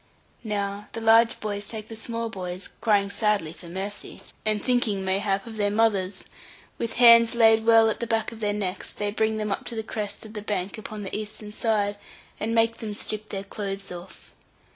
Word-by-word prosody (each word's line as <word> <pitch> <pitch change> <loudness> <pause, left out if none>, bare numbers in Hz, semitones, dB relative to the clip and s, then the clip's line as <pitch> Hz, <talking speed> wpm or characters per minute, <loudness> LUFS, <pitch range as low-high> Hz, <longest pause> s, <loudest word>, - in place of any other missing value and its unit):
Now 205 -1 -3
the - - -4
large 225 +1 +5
boys 205 -1 -4
take 215 -1 -7
the 225 - -8
small 230 +1 -3
boys, 185 -2 -5
crying 200 -3 +3
sadly 205 -8 0
for 170 - -13
mercy, 195 +4 -6 0.2
and 215 -1 0
thinking 230 -6 +1
mayhap, 195 +1 +1
of 225 -2 -8
their 205 -1 +2
mothers, 205 -3 +1 0.5
with 230 -1 -2
hands 235 -1 +7
laid 225 -1 +5
well 225 -1 +7
at 220 - -1
the 235 - -3
back 225 -1 0
of 225 - -10
their 210 -2 0
necks, 200 -2 -3
they 205 0 -2
bring 220 +1 +1
them 215 -1 -2
up - - -1
to 235 - -5
the 220 - -2
crest 210 -1 -5
of 215 - -11
the 210 - -5
bank 200 -1 -3
upon 215 0 -6
the 190 - -4
eastern 210 0 -6
side, 205 -2 0 0.4
and 225 +2 -1
make 230 0 +3
them 210 -2 -5
strip 215 +1 -5
their 195 -1 -4
clothes 195 -1 -5
off. 180 +1 -10
210 Hz, 200 wpm, -26 LUFS, 200-225 Hz, 0.5 s, hands